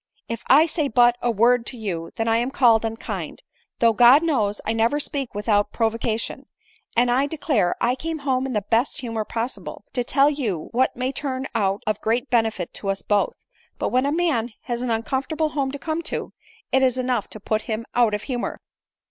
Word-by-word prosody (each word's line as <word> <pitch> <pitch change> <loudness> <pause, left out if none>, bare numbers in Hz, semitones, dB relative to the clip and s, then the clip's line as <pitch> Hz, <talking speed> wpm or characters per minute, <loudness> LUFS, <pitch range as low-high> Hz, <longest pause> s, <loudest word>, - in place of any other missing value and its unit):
If 230 -1 -4
I 295 +4 +7
say 315 -2 -1
but 240 -1 +4
a 245 - +1
word 235 +2 +3
to 250 - -5
you, 175 -7 -4
then 225 -1 -1
Iain 230 +2 +2
called 235 -5 +4
unkind, 225 0 -5 0.3
though, 230 -1 +4
God 245 +7 +7
knows, 220 -11 +1
1 220 - 0
never 230 +6 +2
speak 275 -5 -3
without 205 0 +2
just - - -21
provocation; 225 0 -1 0.5
and, 240 +1 +4
I 265 +3 +2
declare, 275 - 0
I 245 - +2
came 320 +5 -4
home 265 -2 0
in 260 - -4
the 210 -2 0
best 230 +7 0
humor 225 -3 -3
possible, 235 +4 -5
to 245 - 0
tell 275 +3 +3
yon 235 - -2
what 255 +2 +1
may 255 +2 -1
turn 265 -1 -3
out 195 -1 0
of 215 0 -1
great 240 +4 -1
benefit 225 -7 0
to 195 - -4
us 195 0 -2
both; 205 -1 +1 0.2
— - - -34
but - - -1
when 255 +2 +2
a - - +1
man 290 -9 0
has 240 -1 -3
an 250 - -2
uncomfortale 275 +7 -1
home 275 -3 -1
to 285 - -5
come 315 +3 -3
to, - - -4 0.4
it 265 +1 +4
is 255 -1 +2
enough 250 -4 -1
to 215 - -6
put 215 +1 -1
him 220 +1 -2
out 235 -3 +3
of 210 - -5
humor." 250 -3 -3
240 Hz, 205 wpm, -23 LUFS, 220-270 Hz, 0.5 s, I